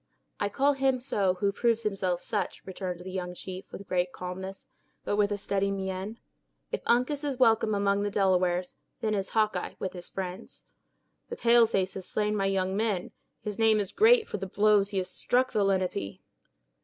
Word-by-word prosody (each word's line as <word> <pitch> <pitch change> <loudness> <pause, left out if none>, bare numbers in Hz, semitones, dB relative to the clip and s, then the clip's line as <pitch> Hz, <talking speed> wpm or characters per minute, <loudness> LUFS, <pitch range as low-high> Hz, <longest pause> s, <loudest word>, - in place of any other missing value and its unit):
"I 205 - 0
call 275 +7 +2
him 270 -1 +1
so 200 -7 +1
who 200 +2 +1
proves 230 +2 +1
himself 190 -4 -1
such," 215 -3 -3
returned 185 -2 -5
the 185 +1 -7
young 180 -1 -4
chief, 185 +1 -8
with 200 - -9
great 180 -1 0
calmness, 190 +2 -7 0.4
but - - 0
with 205 0 +2
a 205 - 0
steady 200 0 0
mien. 190 +2 -4 0.5
"If - - -2
Uncas 255 +5 +2
is 280 -3 -2
welcome 225 -3 +4
among 200 0 +2
the 205 - 0
Delawares, 185 -2 +1 0.3
then 215 -1 0
is 195 -2 -1
Hawkeye 215 -5 0
with 190 - -4
his 175 -1 -5
friends." 190 +2 -7 0.6
"The 475 - -4
pale 235 -1 +5
face 190 -4 0
has 190 -1 -6
slain 210 0 0
my 195 -1 +1
young 190 -1 0
men; 205 -4 -1 0.3
his 210 +1 -5
name 220 -1 +4
is 200 -2 -2
great 450 +1 +5
for - - -4
the 195 -1 -5
blows 205 +1 +3
he 200 - -4
has 185 -1 -1
struck 255 +1 +1
the 215 -4 +2
Lenape." 185 - -1
200 Hz, 190 wpm, -28 LUFS, 185-220 Hz, 0.6 s, pale